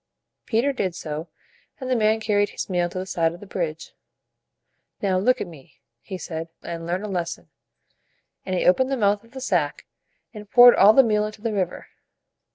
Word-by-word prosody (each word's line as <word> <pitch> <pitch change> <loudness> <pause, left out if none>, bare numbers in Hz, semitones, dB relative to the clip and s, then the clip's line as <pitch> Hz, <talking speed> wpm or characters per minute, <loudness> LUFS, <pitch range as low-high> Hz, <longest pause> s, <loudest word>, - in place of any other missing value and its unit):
Peter 245 +5 +1
did 185 -8 -2
so, 155 0 -5 0.5
and 260 - -6
the 255 - +1
man 220 -1 +2
carried 205 -2 +1
his - - -5
meal 175 -1 +1
to 180 - -8
the 185 - -3
side 165 -3 0
of - - -14
the 205 - -11
bridge. 165 -5 -4 1.1
"Now 190 -2 +1
look 255 +6 +2
at - - -2
me," 160 -7 -15 0.2
he 190 - -7
said, 165 -2 -6
"and 165 -1 -6
learn 180 +3 -2
a - - -4
lesson." 175 -4 -4 0.9
And 185 - -3
he - - 0
opened 260 +9 +3
the 270 - 0
mouth 205 -2 +1
of 230 +2 -22
the 265 - -7
sack, 170 - -1 0.5
and 210 -2 -10
poured 245 +2 +9
all 205 +3 +7
the 270 - +7
meal 210 -3 +1
into 215 0 -11
the 225 -2 -1
river. 185 -3 -3
195 Hz, 195 wpm, -23 LUFS, 175-220 Hz, 1.1 s, poured